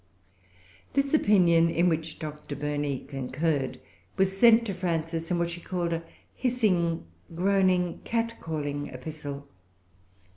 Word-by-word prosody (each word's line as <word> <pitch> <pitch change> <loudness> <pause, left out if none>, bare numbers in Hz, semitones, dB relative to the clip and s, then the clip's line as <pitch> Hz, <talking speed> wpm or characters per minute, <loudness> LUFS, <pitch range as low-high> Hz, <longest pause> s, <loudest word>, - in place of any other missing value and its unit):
This 275 +1 +1
opinion, 175 - +5
in 170 +2 +2
which 160 -1 -1
Dr. 150 -1 -6
Burney 145 -1 -2
concurred, 135 +1 -1 0.4
was 190 0 +2
sent 230 +2 +6
to 200 - -2
Frances, 165 -2 -2
in 180 - +1
what 170 0 0
she 175 0 -7
called 175 -2 -2
"a 165 0 -3 0.3
hissing, 195 - +1 0.3
groaning, 185 -1 +2
catcalling 160 -11 -2
epistle." 140 +1 -7
170 Hz, 115 wpm, -28 LUFS, 150-190 Hz, 0.4 s, sent